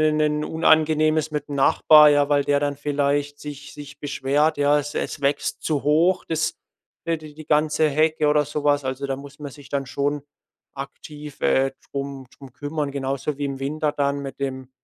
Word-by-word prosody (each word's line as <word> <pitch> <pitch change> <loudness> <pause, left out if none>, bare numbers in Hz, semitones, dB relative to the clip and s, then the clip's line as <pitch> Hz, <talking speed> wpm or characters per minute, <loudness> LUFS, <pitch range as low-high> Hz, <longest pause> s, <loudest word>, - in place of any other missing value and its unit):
'n 155 0 +3
'nen 150 0 +1
unangenehmes 155 -1 +2
mit 150 -1 -4
'm 145 - -5
Nachbar, 150 +2 +6
ja, 145 -1 +3
weil 145 -1 +2
der 145 0 +2
dann 145 -1 -1
vielleicht 145 0 -1
sich 145 -1 -8
sich 145 0 -11
beschwert, 145 +2 +1
ja. 145 +1 +4
Es 145 +1 -5
es - - -3
wächst 140 +1 -1
zu 150 -3 -1
hoch, 165 +5 +3
das, 160 -1 -1 0.5
äh, 165 0 0
d 155 -1 -12
die 155 0 -11
ganze 155 +1 +2
Hecke 155 +1 +2
oder 150 0 +3
so 150 +1 -5
was. 145 -1 +2
Also, 130 +1 -3
da 135 - -2
muss 140 +1 -12
man 145 -2 -7
sich 145 0 -14
dann 140 -1 -2
schon 140 +2 -2 0.5
aktiv, 145 +1 -9
äh, 135 0 +2 0.2
drum 140 -1 -5
drum 135 -3 -13
kümmern, 145 +1 -3
genauso 140 +1 -3
wie 145 - -2
im 135 -1 -5
Winter 150 +2 -1
dann 140 0 0
mit 135 0 -8
dem 130 -1 -4
145 Hz, 195 wpm, -23 LUFS, 140-150 Hz, 0.5 s, Nachbar